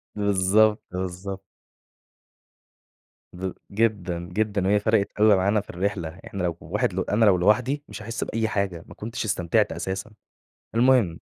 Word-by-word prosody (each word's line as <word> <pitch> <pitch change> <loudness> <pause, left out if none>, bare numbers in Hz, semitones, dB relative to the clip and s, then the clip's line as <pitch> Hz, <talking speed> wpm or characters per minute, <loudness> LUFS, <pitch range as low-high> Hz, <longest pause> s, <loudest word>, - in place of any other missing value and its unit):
بالضبط، 105 +1 +3
بالضبط. 95 +2 -5 1.9
ب 95 +1 -4 0.2
جدًا، 100 -5 0
جدًا، 105 -2 0
وهي 105 +1 +4
فرَقِت 105 -1 +1
أوي 105 -1 +6
معانا 100 +3 +2
في - - -22
الرحلة، 90 -2 -3
إحنا 100 -2 -4
لو 85 -2 -1
واحد - - -1
ل - - -2
أنا 110 +3 +3
لو 100 -3 +5
لوحدي 125 +10 +2
مش - - -8
هاحس 115 +1 -4
بأي 110 0 -1
حاجة، 100 -5 -2
ما - - -11
كنتش 115 +2 -5
استمتعت 90 -5 +1
أساسًا، 95 +3 -4 0.6
المهم 120 -8 +3
100 Hz, 145 wpm, -25 LUFS, 95-110 Hz, 1.9 s, أوي